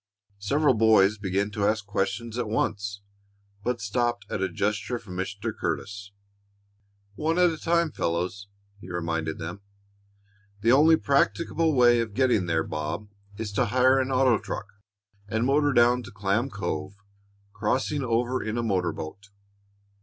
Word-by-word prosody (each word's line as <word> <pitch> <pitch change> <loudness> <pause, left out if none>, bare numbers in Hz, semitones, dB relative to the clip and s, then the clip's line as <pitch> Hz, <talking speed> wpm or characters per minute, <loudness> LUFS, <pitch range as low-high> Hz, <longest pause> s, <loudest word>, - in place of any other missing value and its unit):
Several 140 +8 +2
boys 110 -2 +4
began 100 +1 -1
to 105 -2 0
ask 105 -1 0
questions 105 +3 -2
at 120 - -1
once, 100 -2 -2 0.6
but 125 +1 -1
stopped 120 +2 -1
at - - -2
a 95 - 0
gesture 105 +6 -1
from 105 -6 -10
Mr. 100 +4 -4
Curtis. 100 +4 -4 1.0
"One 160 +10 -1
at 180 -1 +5
a 160 - -5
time, 170 -1 +1
fellows," 90 +3 -2 0.3
he 95 - -11
reminded 80 -2 -2
them. 85 +4 -6 1.0
"The 115 +3 +4
only 155 +5 +6
practicable 160 +3 +1
way 120 -1 +5
of 110 -3 -3
getting 125 -8 +2
there, 80 -1 +1
Bob, 80 +8 -4 0.3
is 110 -1 -4
to 115 +5 +1
hire 130 +4 +4
an 130 0 0
auto 130 -3 +3
truck - - -5 0.6
and 110 +3 0
motor 145 +2 +3
down 120 0 +4
to 120 - -11
Clam 100 +5 0
Cove, 95 - -4 0.6
crossing 130 +7 -1
over 120 +1 0
in 110 +1 -3
a 120 - 0
motor 90 -6 0
boat. 100 +6 -8
110 Hz, 150 wpm, -26 LUFS, 100-125 Hz, 1.0 s, only